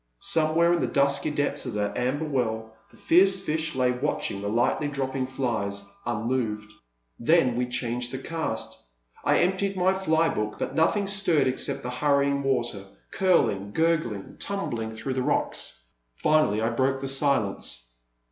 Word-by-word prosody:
Somewhere 165 - +2
in 175 - +1
the - - +1
dusky 140 +1 +2
depths 145 -1 -1
of 125 - -4
that 105 -1 -1
amber 140 +6 -1
well 110 -6 -2 0.2
the - - -20
fierce 190 +3 +4
fish 155 -2 -2
lay 125 -1 +2
watching 125 -6 -2
the 100 - -2
lightly 120 +7 +1
dropping 135 -2 -2
flies, 105 -7 -2 0.2
unmoved. 110 -2 -2 0.5
Then 130 -1 +3
we 125 +1 0
changed 120 0 -2
the 130 - -4
cast; 160 +4 -4 0.4
I - - +3
emptied 190 +2 0
my 185 +1 +3
fly 165 -4 +2
book, 105 0 -2
but - - -3
nothing 195 +6 +2
stirred 195 -5 +2
except 130 0 -1
the 125 - -4
hurrying 140 +1 +2
water, 120 -7 -1 0.3
curling, 105 - +1
gurgling, 155 -12 0
tumbling 115 - -3
through 120 +4 -4
the 130 - -1
rocks. - - -1 0.3
Finally 155 - +2
I 115 - +1
broke 130 +3 +1
the 135 - -4
silence. 110 - 0
135 Hz, 155 wpm, -26 LUFS, 115-160 Hz, 0.5 s, fierce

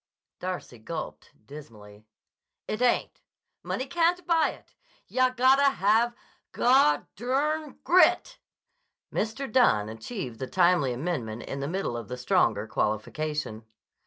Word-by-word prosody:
Darcy 180 -10 -6
gulped 155 +8 -7 0.2
dismally. 110 -7 -13 0.6
"It 215 - -3
ain't. 250 -1 +1 0.4
Money 260 - -3
can't 345 +4 +1
buy 330 -2 +3
it. - - -13 0.3
Yah 255 0 +2
gotta 265 +2 +4
have 225 +4 +2 0.4
gu—grit." 275 - +2 0.7
Mr. 225 +4 -3
Dunne 110 - +3
achieved 115 - -7
the 130 - -4
timely 175 -6 +3
amendment 120 -5 -4
in 140 - -6
the 140 - -3
middle 180 -6 -2
of 115 -3 -6
the 125 - -6
stronger 110 -4 +1
qualification. 110 +3 -3
180 Hz, 110 wpm, -27 LUFS, -, 0.7 s, gotta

